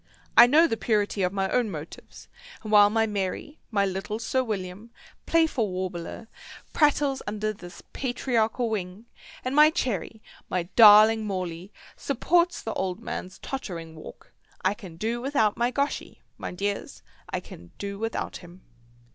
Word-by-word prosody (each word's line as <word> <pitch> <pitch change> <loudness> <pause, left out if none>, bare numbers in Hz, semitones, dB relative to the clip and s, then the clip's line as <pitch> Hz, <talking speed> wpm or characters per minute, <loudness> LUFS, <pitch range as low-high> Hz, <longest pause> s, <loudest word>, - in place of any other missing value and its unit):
I 235 - +10
know 310 +6 +6
the 225 - -1
purity 210 -2 0
of 180 -1 +1
my 195 -1 -1
own 245 -3 +1
motives, 160 -3 -10 0.4
and 215 - -6
while 205 -1 +7
my 225 +1 +2
Merry, 205 +8 -4
my 200 -3 +1
little 195 +2 -3
Sir 260 +3 0
William, 200 -1 -5 0.4
playful 320 -10 +2
warbler, 185 +3 -5 0.5
prattles 290 -3 +2
under 215 +1 -2
this 175 -3 -12
patriarchal 245 -2 0
wing, 195 +1 -4 0.4
and 255 +2 -1
my 300 +1 +8
Cherry, 225 - -3 0.3
my 180 -2 0
darling 215 0 +8
Morley, 185 -1 -4 0.2
supports 340 +6 +1
the 225 - -3
old 185 -1 -3
man's 185 +1 -6
tottering 170 -11 -6
walk, 155 - -13 0.3
I 190 - +2
can 190 -6 -11
do 230 +5 -2
without 240 -6 +1
my 240 +1 +1
Goschy, 280 +2 -3
my - - -6
dears, 200 +2 -4 0.3
I - - -2
can 85 0 -13
do 200 0 -6
without 225 +1 -3
him." 175 +1 -15
215 Hz, 150 wpm, -26 LUFS, 190-240 Hz, 0.5 s, I